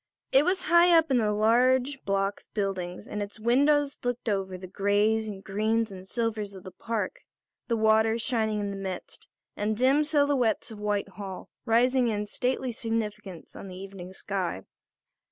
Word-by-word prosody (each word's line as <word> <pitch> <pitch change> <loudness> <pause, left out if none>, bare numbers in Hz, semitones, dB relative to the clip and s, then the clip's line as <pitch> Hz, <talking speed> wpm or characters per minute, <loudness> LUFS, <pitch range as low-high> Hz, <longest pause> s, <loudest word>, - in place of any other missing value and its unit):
It 275 +2 +5
was 370 +1 +1
high 340 +1 +6
up 320 -3 +2
in 260 - +4
the 215 -3 +2
large 250 +5 +2
block 195 0 0
of - - -37
buildings 190 -3 -3
and 210 - -4
its 205 +1 -6
windows 280 +5 +2
looked 245 -1 -2
over 190 -2 -2
the 185 - -9
greys 205 +3 +1
and 195 -2 -8
greens 220 +2 0
and 190 0 -10
silvers 215 -3 -2
of 185 - -11
the 185 - -9
park, 215 +1 -4 0.5
the 230 - +1
water 220 +1 +3
shining 220 -2 0
in 205 -1 -2
the 200 - -5
midst, 190 -2 -6 0.3
and 210 +1 -1
the - - -9
dim 275 +4 +4
silhouettes 285 -7 +1
of 215 - -9
Whitehall 200 -2 -4 0.2
rising 250 +2 +3
in 210 -2 -1
stately 250 +4 -1
significance 215 -5 -4
on - - -8
the 185 -1 -9
evening 190 -1 -9
sky. 190 - -3
220 Hz, 170 wpm, -27 LUFS, 195-245 Hz, 0.5 s, high